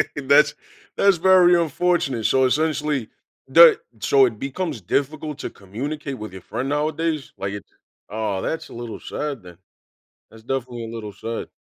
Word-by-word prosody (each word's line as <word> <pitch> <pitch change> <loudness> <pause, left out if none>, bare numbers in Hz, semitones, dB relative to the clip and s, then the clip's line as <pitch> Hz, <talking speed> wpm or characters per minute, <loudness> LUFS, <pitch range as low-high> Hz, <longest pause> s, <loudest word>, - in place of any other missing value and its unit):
That's 140 +1 +4 0.4
that's 200 -2 +4
very 180 0 +6
unfortunate. 160 -7 0
So, 130 +4 +3
essentially 150 -3 0 0.4
the 475 -3 +8 0.2
so 415 -2 +5
it 380 - -3
becomes 140 - -4
difficult 145 - -2
to - - -4
communicate 135 +8 -6
with 105 -3 -8
your 95 - -9
friend, 130 +9 -4
nowadays? 155 0 -1
Like 100 0 -4
it's 105 -4 -8 0.4
aw, 105 -2 -2
that's 160 - -4
a - - -12
little 120 -1 -7
sad, 145 -5 -5
then. 90 -2 -13 0.7
That's 110 0 -15
definitely 125 -1 -4
a 115 - -8
little 105 -3 -6
sad. 115 +4 -6
135 Hz, 155 wpm, -22 LUFS, 115-155 Hz, 0.7 s, the